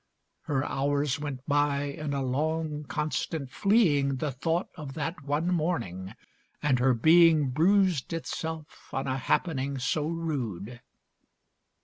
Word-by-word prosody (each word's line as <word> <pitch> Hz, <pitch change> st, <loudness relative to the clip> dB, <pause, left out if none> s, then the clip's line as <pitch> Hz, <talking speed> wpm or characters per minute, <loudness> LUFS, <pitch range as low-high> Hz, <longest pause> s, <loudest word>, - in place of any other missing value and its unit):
Her 135 Hz, -1 st, 0 dB
hours 145 Hz, +1 st, 0 dB
went 145 Hz, -3 st, -5 dB
by 145 Hz, -1 st, +2 dB
in 145 Hz, +1 st, -4 dB
a 135 Hz, -, -1 dB
long 150 Hz, +3 st, -1 dB
constant 150 Hz, -1 st, -3 dB
fleeing 145 Hz, -, +3 dB
The 145 Hz, +2 st, -2 dB
thought 165 Hz, +7 st, -1 dB
of 145 Hz, -5 st, -8 dB
that 165 Hz, +1 st, -3 dB
one 150 Hz, +5 st, 0 dB
morning. 115 Hz, -, -2 dB, 0.4 s
And 135 Hz, -4 st, +2 dB
her 125 Hz, 0 st, +3 dB
being 160 Hz, +1 st, +5 dB
Bruised 180 Hz, +1 st, +3 dB
itself 160 Hz, -1 st, -5 dB
on 135 Hz, -, -2 dB
a 130 Hz, 0 st, -1 dB
happening 140 Hz, -1 st, 0 dB
so 150 Hz, +3 st, 0 dB
rude. 125 Hz, -, -4 dB
145 Hz, 125 wpm, -28 LUFS, 135-160 Hz, 0.4 s, being